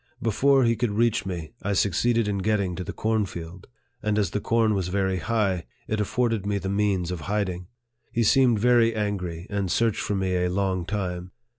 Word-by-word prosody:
Before 135 +5 +3
he 115 -1 +3
could 120 0 0
reach 115 0 +1
me, 85 -4 -5
I 100 - -1
succeeded 110 +4 +2
in 100 -1 -1
getting 100 -2 0
to 90 - -4
the - - -5
cornfield; 95 -6 -3 0.3
and 105 -1 0
as 100 -5 +1
the 105 - -1
corn 115 0 +2
was 95 -3 -1
very 95 0 0
high, 100 -5 0 0.2
it 110 - -1
afforded 115 0 0
me 100 0 -1
the 95 -1 -3
means 100 -3 0
of 90 - -3
hiding. 95 -4 -2 0.4
He 115 - +1
seemed 125 +1 +4
very 115 0 +4
angry, 90 -5 -3
and 100 -2 -1
searched 115 +3 +1
for 105 - -1
me 95 -1 0
a 90 0 +1
long 95 -1 -1
time. 90 -3 -3
100 Hz, 190 wpm, -25 LUFS, 90-110 Hz, 0.4 s, seemed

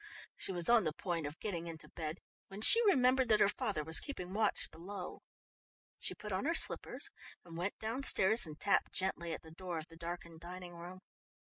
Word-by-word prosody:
She - - -1
was 175 -2 +2
on 235 -3 +6
the 155 -3 -1
point 165 -3 -3
of 145 +3 -8
getting 170 -5 -4
into 160 -2 -8
bed 160 +1 -6 0.3
when 195 +1 -9
she 460 - +8
remembered 255 -7 +4
that 215 - +5
her - - +6
father 200 -5 -1
was 160 +2 +4
keeping 185 -11 -6
watch 215 0 0
below. 185 +3 -8 0.8
She - - -3
put 210 - -7
on 190 +7 -1
her 335 +3 +1
slippers - - +1 0.3
and 170 -1 -10
went 180 +4 -3
downstairs 220 -3 +3
and 155 0 -9
tapped 200 - +1
gently 180 -3 -1
at - - -5
the 160 - -13
door 175 0 -5
of 160 +1 -6
the 165 - -14
darkened 170 -1 -7
dining 175 +1 -9
room. 175 +2 -9
180 Hz, 195 wpm, -35 LUFS, 165-210 Hz, 0.8 s, she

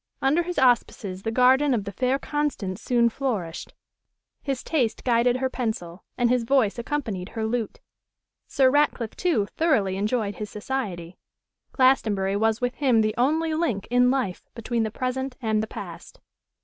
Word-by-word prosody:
Under 285 +6 +2
his 355 +1 -5
auspices 225 -6 +1
the 220 - -2
garden 260 +3 +4
of 210 - -2
the 200 - -6
fair 255 +7 0
Constance 275 -11 -3
soon 240 -2 +3
flourished: 220 -10 -3 0.7
his 270 -3 -3
taste 250 -9 -1
guided 240 0 +3
her 260 0 0
pencil, 220 -9 -4
and 245 - +3
his 245 0 +2
voice 235 -3 +2
accompanied 225 -8 -3
her 225 -1 -3
lute. 225 -1 -2 0.7
Sir 265 -2 +3
Ratcliffe, 275 -6 +1
too, 320 - +1
thoroughly 205 - +2
enjoyed 210 -1 -1
his 210 -1 -5
society: 205 -7 -5 0.5
Glastonbury 215 -7 +2
was 220 +2 +1
with 245 0 -1
him 255 -6 +3
the 215 0 +1
only 315 +6 +1
link, 310 - -1
in 245 0 +4
life, 250 -9 -2
between 230 0 -2
the 220 - 0
present 255 +3 -3
and 220 -3 0
the 220 - -3
past. - - -9
240 Hz, 160 wpm, -25 LUFS, 210-265 Hz, 0.7 s, garden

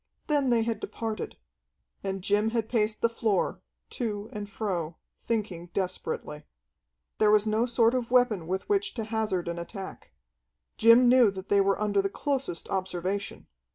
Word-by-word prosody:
Then 290 -3 +1
they 235 -2 +3
had 225 -2 -2
departed. 220 -1 -5 0.7
And 195 -1 -3
Jim 210 +3 +2
had 225 -1 -1
paced 215 -2 0
the - - +5
floor, 220 -4 0 0.3
to 215 -3 -4
and 205 -1 -5
fro, 180 -6 -3 0.3
thinking 200 -7 -2
desperately. 180 -5 -3 0.8
There 215 - +5
was 210 0 +5
no 220 +3 +1
sort 235 -1 +3
of 250 -2 -1
weapon 240 -9 +3
with 190 +2 -2
which 415 0 0
to 225 - -2
hazard 215 -5 -1
an 170 0 -3
attack. 190 +3 -8 0.7
Jim 230 +2 +7
knew 245 -2 +6
that 195 0 -8
they 200 -1 +5
were 195 0 +2
under 205 -1 +2
the 195 - -1
closest 270 - -2
observation. 190 +1 -3
210 Hz, 155 wpm, -28 LUFS, 195-230 Hz, 0.8 s, Jim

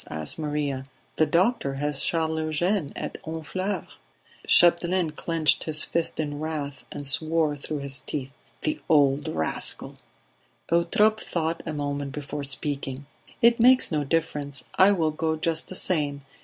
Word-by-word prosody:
asked 80 - -2
Maria. 145 -3 -2 0.4
"The 155 - +3
doctor 175 - +1
has 145 0 -1
Charles 160 -1 0
Eugene 160 +2 0
at - - -6
Honfleur." 175 +4 -3 0.6
Chapdelaine 175 -1 +5
clenched 160 0 +1
his 155 -1 +5
fist 170 -1 -1
in 145 -2 -3
wrath 150 -3 -4
and 145 - -6
swore 155 +2 +2
through 145 +1 -4
his 140 -1 0
teeth: 135 -2 -5 0.3
"The 310 0 -1
old 145 -2 +3
rascal!" 80 -1 -1 0.8
Eutrope 210 +6 +3
thought 165 -1 -2
a 155 - -3
moment 145 -1 -3
before 145 0 -5
speaking. 140 -1 -3 0.4
"It 235 0 +6
makes 255 -1 +5
no 150 -2 0
difference. 145 -2 -2
I 190 +2 +6
will 165 -6 +1
go 160 +1 -1
just 160 0 -2
the 185 - -7
same. 145 -7 -1
155 Hz, 140 wpm, -26 LUFS, 145-170 Hz, 0.8 s, It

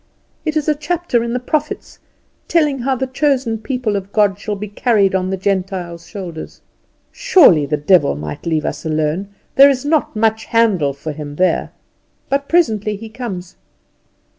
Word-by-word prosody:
It 310 0 0
is 305 - -1
a 305 - +4
chapter 305 -3 -1
in 235 0 -3
the 250 - 0
prophets, 300 +4 -3 0.5
telling 300 -5 +2
how 265 +2 0
the 265 - -2
chosen 260 -4 0
people 245 -2 -2
of 195 0 -4
God 205 -2 +2
shall 210 0 -3
be 205 +1 -6
carried 205 -2 +2
on 185 -1 0
the 190 - -2
Gentiles' 185 -3 -3
shoulders. 175 -6 -8 0.5
Surely 365 - +5
the 150 - 0
devil 150 - +3
might 75 - -7
leave 160 -2 0
us - - -4
alone; 155 +4 -1 0.3
there 275 +1 +9
is 270 -1 -1
not 300 -4 +1
much 220 0 +1
to - - -23
handle 200 -12 +2
for 140 +3 -6
him 145 -1 -7
there. 185 +3 +1 0.6
But 280 0 0
presently 220 - +2
he 220 +2 -9
comes. 200 -7 -7
210 Hz, 170 wpm, -18 LUFS, 180-265 Hz, 0.6 s, there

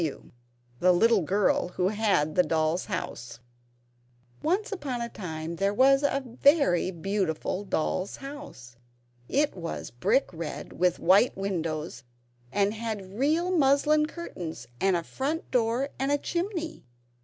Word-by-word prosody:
W., 155 -4 -4 0.5
the 180 - +5
Little 220 +3 +4
Girl 190 +3 +2
Who 180 +1 +2
Had 205 -8 +1
the 180 - +5
Doll's 160 +1 0
House] 120 - -5 1.0
Once 380 +7 0
upon 280 -11 -3
a 235 0 -3
time 165 -4 -6
there 200 +3 +1
was 270 +3 +5
a 280 -1 0
very 250 - +3
beautiful 190 0 -2
doll's 185 +1 -1
house; 275 - -10 0.5
it 290 -2 +1
was 170 -3 -5
red 275 - +3
brick 165 -2 -6
with 180 0 +2
white 195 +7 +4
windows, 165 -9 -3 0.5
and 200 +4 +2
it - - -8
had 210 -3 -5
real 330 +6 +2
muslin 300 +1 +4
curtains 185 - -7
and 195 -1 +3
a 170 - -1
front 290 - -3
door 245 +3 +1
and 270 +1 0
a 290 - +3
chimney. 340 0 -3
205 Hz, 140 wpm, -27 LUFS, 175-275 Hz, 1.0 s, the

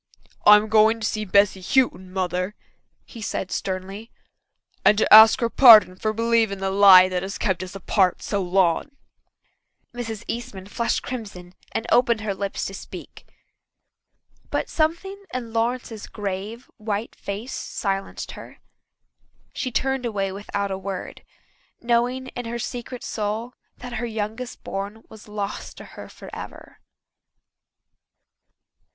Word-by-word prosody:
"I'm 210 +1 +8
going 220 +1 +4
to 220 - -3
see 215 0 -2
Bessy 200 0 +3
Houghton, 190 -4 +1
Mother," 185 +1 -2 0.5
he 230 - -11
said 190 -2 -4
sternly, 195 +4 -4 0.7
"and 210 - +5
to 220 - +3
ask 220 +4 +9
her 235 - +1
pardon 220 -8 +8
for 215 +3 -2
believing 225 -2 +1
the 190 0 -2
lie 190 -2 +8
that 185 -1 -2
has 190 +1 -5
kept 190 -4 -1
us 185 +1 -8
apart 190 -1 +1
so 200 - -1
long." 185 - +1 1.0
Mrs. 225 -3 -6
Eastman 205 -5 -6
flushed 230 +4 -2
crimson 200 -8 -7 0.2
and 225 - -3
opened 235 -2 +3
her 210 -2 -2
lips 195 0 -4
to 195 - -5
speak. 195 - -10 1.2
But - - -2
something 345 +5 -1
in 235 -3 -5
Lawrence's 230 -1 -2
grave, 205 +4 -6
white 215 0 -4
face 205 +6 -6
silenced 195 -1 -4
her. - - -12 1.0
She 255 - -3
turned 265 0 -1
away 195 -3 -2
without 200 0 -4
a 190 - -3
word, 195 -1 -6 0.6
knowing 245 +2 0
in 245 - -7
her 235 +1 -4
secret 240 +2 -6
soul 220 +3 -3 0.2
that 245 0 -9
her 240 - -2
youngest 225 +3 -5
born 200 +3 -6
was 220 -1 -14
lost 205 -1 -5
to - - -10
her - - -11
forever. - - -11
215 Hz, 135 wpm, -23 LUFS, 195-235 Hz, 1.2 s, ask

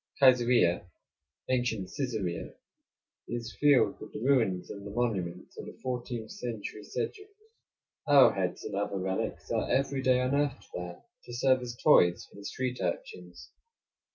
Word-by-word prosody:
Kaisarieh 120 -10 +4 0.6
(ancient 120 -6 0
Csesarea) 110 -11 -3 0.7
is 120 -1 -5
filled 145 -3 +4
with - - -10
the - - -5
ruins 115 -9 +2
and 100 - -8
the 100 - -7
monuments 100 -6 -2
of - - -7
the - - -10
fourteenth 120 -3 -4
century 110 -3 -6
Seljuks. 415 - -9
Arrowheads 110 -10 +5
and - - -6
other 100 0 -1
relics 95 0 -3
are - - 0
every 135 0 +1
day 130 -1 +4
unearthed 140 +2 0
there, 90 0 -6 0.2
to 120 - -9
serve 130 +1 +3
as 120 -1 -6
toys 90 - +5
for - - -21
the 100 - -10
street 125 -1 -3
urchins. 90 -4 -5
120 Hz, 140 wpm, -30 LUFS, 95-130 Hz, 0.7 s, Arrowheads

